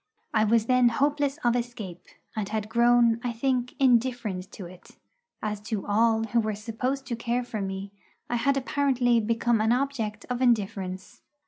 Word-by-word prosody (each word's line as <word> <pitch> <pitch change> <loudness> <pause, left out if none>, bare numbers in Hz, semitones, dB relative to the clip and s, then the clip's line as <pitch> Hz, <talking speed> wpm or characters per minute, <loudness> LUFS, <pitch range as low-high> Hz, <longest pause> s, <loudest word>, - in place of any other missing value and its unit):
I 215 -1 +3
was 225 0 +3
then 250 0 +4
hopeless 285 +3 0
of 240 -1 +3
escape, 230 -7 -5 0.3
and 210 -2 -3
had 215 -1 -3
grown, 235 0 +4
I 245 - -1
think, 250 +1 -1
indifferent 240 -8 +1
to 190 - -8
it, 180 +1 -14 0.5
as 210 -1 -2
to 215 -4 -2
all 225 +2 +2
who 225 +1 +1
were 215 -2 -1
supposed 250 +6 -3
to 240 - -3
care 240 +2 -1
for 220 -3 -5
me 195 0 -5 0.4
I 240 - -1
had 275 +3 +1
apparently 260 -3 +2
become 230 +1 +1
an 220 +1 +2
object 245 -5 -1
of 250 0 -3
indifference. 195 -6 -1
235 Hz, 165 wpm, -26 LUFS, 215-250 Hz, 0.5 s, then